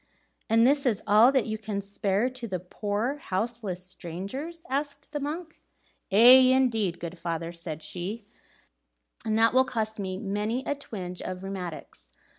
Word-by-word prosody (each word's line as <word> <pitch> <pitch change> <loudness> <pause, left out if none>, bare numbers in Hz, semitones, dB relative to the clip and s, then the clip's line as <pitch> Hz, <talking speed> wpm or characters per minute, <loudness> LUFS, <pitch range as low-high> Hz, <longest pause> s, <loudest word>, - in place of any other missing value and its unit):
"And 225 +2 +5
is 280 +1 +3
this 240 -7 0
all 215 +5 +6
that 265 -4 +2
you 220 -1 -3
can 215 -2 -3
spare 200 +2 0
to 255 -2 -6
the 185 -3 -3
poor 210 - -3
houseless 195 -2 -3
strangers?" 200 - -7
asked 285 +1 -3
the 295 - -2
monk. 315 +4 -5 0.5
"Aye, 250 +5 +8
indeed, 225 -9 +1
good 170 +1 -6
father," 165 -1 -3
said 165 -2 -7
she, 200 +5 -5 1.0
"and 215 0 +2
that 225 +1 +4
will 260 +1 +6
cost 220 -4 -3
me 190 -1 -3
many 210 +5 -2
a - - 0
twinge 190 -10 -7
of 185 0 -5
rheumatics. 175 - -7
215 Hz, 155 wpm, -27 LUFS, 185-255 Hz, 1.0 s, Aye